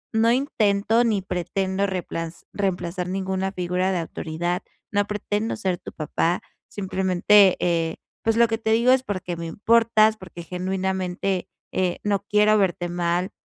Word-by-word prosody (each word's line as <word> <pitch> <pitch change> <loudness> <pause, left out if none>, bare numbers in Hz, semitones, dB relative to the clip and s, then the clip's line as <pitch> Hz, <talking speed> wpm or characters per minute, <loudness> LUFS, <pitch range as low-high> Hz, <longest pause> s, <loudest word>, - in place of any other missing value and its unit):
no 225 +1 +4
intento 225 -4 +2
ni 215 -4 +1
pretendo 190 +2 -1
repla 165 -3 -4 0.2
reemplazar 180 -2 -2
ninguna 190 0 -2
figura 180 0 -1
de 180 - 0
autoridad, 170 +2 -3 0.3
no 205 -1 +2
pretendo 210 +1 -2
ser 190 -4 -1
tu - - -9
papá, 165 +3 -1 0.3
simplemente, 190 0 +3
eh, 165 -2 0 0.3
pues 225 0 +1
lo 235 0 +6
que 225 0 -1
te 220 0 -1
digo 235 +3 +4
es 260 0 +4
porque 185 -5 -4
me 165 0 -5
importas, 220 +3 +3
porque 180 -3 -10
genuinamente, 185 +1 -2 0.2
eh, 180 -2 0
no 200 -1 0
quiero 210 +1 +4
verte 175 -2 0
mal, 175 +2 -1
190 Hz, 145 wpm, -24 LUFS, 180-210 Hz, 0.3 s, lo